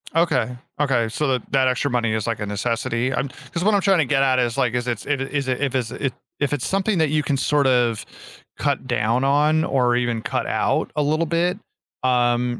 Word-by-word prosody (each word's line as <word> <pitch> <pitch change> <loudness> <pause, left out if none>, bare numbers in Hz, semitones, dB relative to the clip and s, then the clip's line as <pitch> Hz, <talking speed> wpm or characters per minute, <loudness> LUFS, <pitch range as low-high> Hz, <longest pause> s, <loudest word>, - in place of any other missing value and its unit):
Okay 165 -7 +1 0.2
okay 125 -6 +2
so, 150 +6 -1
that 130 -3 -2
that 135 -1 +3
extra 130 +3 0
money 120 -3 0
is, 110 -1 -2
like, 115 -2 -2
a 105 - -3
necessity, 115 +4 -1
I'm 135 - -1 0.2
'cause 170 - -2
what 210 +2 +3
I'm 200 - +3
trying 190 -3 +3
to 150 - +3
get 135 0 +2
at 130 -1 +3
is, 120 -2 0
like, 120 -2 +1
is 125 0 -2
it's 115 -4 -3
it 145 -2 -1
a 135 +2 -5
is 140 -2 0
it 130 0 -1
if 135 -2 -1
it's 120 -4 -1
a 140 - -4
if 130 - 0 0.3
if 145 -1 0
it's 135 - -2
something 195 +1 0
that 160 -2 +2
you 150 0 +1
can 140 -1 0
sort 145 0 +2
of 120 -4 +2 0.5
cut 140 -2 -1
down 120 +1 +1
on, 150 +3 +3
or 125 -5 +2
even 120 -2 0
cut - - -2
out - - 0
a 150 - +1
little 155 +3 +1
bit, 170 +3 0 0.5
um, 120 -1 +1
130 Hz, 240 wpm, -22 LUFS, 120-145 Hz, 0.5 s, that